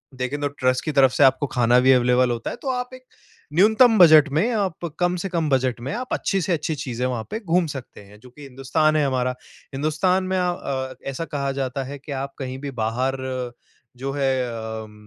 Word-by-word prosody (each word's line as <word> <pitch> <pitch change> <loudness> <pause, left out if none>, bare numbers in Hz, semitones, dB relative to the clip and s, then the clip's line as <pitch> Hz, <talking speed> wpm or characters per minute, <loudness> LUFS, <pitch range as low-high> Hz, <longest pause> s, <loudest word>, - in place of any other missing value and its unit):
देखें 130 +3 -3
तो 145 - +1
ट्रस्ट 130 -2 -1
की 155 - -1
तरफ़ 135 -2 +5
से - - +3
आपको 135 +2 +4
खाना 125 -1 +3
भी 130 +1 +5
अवेलेबल 125 0 +3
होता 115 -1 -3
है, - - -5
तो 270 - -5
आप 250 0 -3
एक 255 0 -12 0.5
न्यूनतम 220 +6 +5
बजट 155 -3 +8
में, 160 - +1
आप 190 -5 -2
कम 175 0 +1
से 195 - -3
कम 165 -4 -1
बजट 130 -2 +1
में, 130 - -4
आप 255 +2 -4
अच्छी 195 - 0
से 180 +1 0
अच्छी 155 0 -2
चीज़ें 125 -3 -4
वहाँ 125 -3 -2
पे 220 - -3
घूम 180 -4 +1
सकते 130 -5 -9
हैं। 105 +1 -16
जो 125 - -15
कि 135 +4 -16
हिंदुस्तान 140 +4 0
है 150 -1 +2
हमारा, 125 -2 0 0.4
हिंदुस्तान 160 +6 +1
में 185 0 -1
आ 180 -1 +1
अ, 130 -5 -4
ऐसा 135 +4 -4
कहा 140 -3 -3
जाता 135 +1 -3
है 140 +2 -7
कि 145 +1 -10
आप 140 - -7
कहीं 130 -1 -5
भी 140 -1 -5
बाहर 125 +5 0 0.8
जो 135 +2 -4
हैं 130 -3 0 0.3
उम, 105 - -14
140 Hz, 220 wpm, -23 LUFS, 130-170 Hz, 0.8 s, बजट